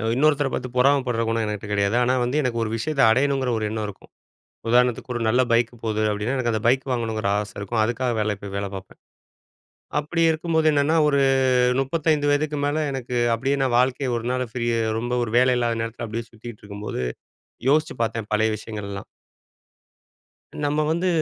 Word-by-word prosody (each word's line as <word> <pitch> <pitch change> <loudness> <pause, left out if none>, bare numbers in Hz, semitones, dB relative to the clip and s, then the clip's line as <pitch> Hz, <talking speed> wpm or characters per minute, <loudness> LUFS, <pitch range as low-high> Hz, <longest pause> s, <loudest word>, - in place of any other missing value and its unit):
இன்னொருத்தர 145 0 +2
பார்த்து 130 - -3
பொறாமைப்படுற 125 -3 +2
குணம் 115 0 0
எனகிட்ட 105 -1 -4
கெடையாது. 100 +3 +1
ஆனா 125 +1 +2
வந்து 125 +4 -1
எனக்கு 120 -3 -1
ஒரு 110 - -2
விஷயத்த 145 +5 -2
அடையணுங்கிற 135 +1 +1
ஒரு 110 - -2
எண்ணம் 110 -1 -3
இருக்கும். 100 - -12 0.6
உதாரணத்துக்கு, 125 +1 +2
ஒரு 120 - -2
நல்ல 125 +3 +3
பைக் 115 0 +3
போது 110 -1 -1
அப்டின்னா 105 +6 -2
எனக்கு 120 -3 0
அந்த 110 - -1
பைக் 130 +2 +3
வாங்கணுங்கிற 110 -4 -1
ஆசை 105 0 -5
இருக்கும். 110 +3 -1
அதுக்காக 120 +2 -1
வேலைக்கு 105 -2 -2
போய் 100 - -7
வேலை 100 0 -2
பார்ப்பேன். 95 0 -10 1.0
அப்படி 165 +3 -1
இருக்கும்போது 160 0 0
என்னன்னா, 145 +3 +2
ஒரு 140 - +2 0.6
35 145 0 +1
மேல, 155 +2 0
எனக்கு 125 -2 -4 0.2
அப்படியே 135 +5 0
நான் 130 -3 +2
வாழ்க்கையை 130 +1 +1
ஒரு 115 - -4
நாள் 125 0 -1
ஃப்ரீ 120 -2 -2 0.3
ரொம்ப 120 +2 -3
ஒரு 110 - -6
வேலை 125 0 +4
இல்லாத 115 -1 0
நேரத்தில 115 +1 -5
அப்படியே 115 +1 -5
சுத்திட்டிருக்கும்போது, 105 - -7 0.7
யோசிச்சுப் 145 -4 +1
பார்த்தேன் 115 -1 -3
பழைய 110 +1 +2
விஷயங்கள் 105 -2 -7
எல்லாம். 100 0 -6 1.6
நம்ம 150 +1 +1
வந்து 180 +3 0
120 Hz, 165 wpm, -23 LUFS, 110-140 Hz, 1.6 s, வேலை